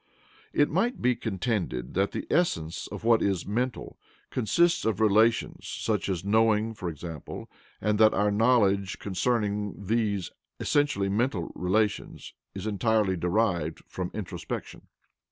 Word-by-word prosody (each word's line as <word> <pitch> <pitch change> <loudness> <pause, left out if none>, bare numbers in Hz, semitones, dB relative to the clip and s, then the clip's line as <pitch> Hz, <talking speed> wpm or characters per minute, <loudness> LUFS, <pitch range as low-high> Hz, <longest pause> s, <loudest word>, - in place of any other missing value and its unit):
It 145 - +3
might 215 - +1
be 125 0 +2
contended 95 - -2
that 95 +2 +1
the - - -4
essence 80 - 0
of - - -8
what 115 -1 +4
is 95 -4 0
"mental" 120 +5 -3 0.3
consists 170 +9 +2
of 110 -3 0
relations, 110 +2 +2
such - - -2
as 95 -1 -2
knowing 110 +1 +3
for 95 -5 -4
example, 80 -1 -7 0.3
and 105 0 0
that 110 0 +7
our 105 +1 +2
knowledge 100 -3 +3
concerning 105 0 -1
these 105 -3 0 0.3
essentially 145 -9 +1
mental 100 -3 0
relations 105 +3 -1 0.2
is - - -5
entirely 110 -2 +1
derived 90 -2 0
from 90 -1 -4
introspection. 105 -4 -6
105 Hz, 130 wpm, -27 LUFS, 95-115 Hz, 0.3 s, that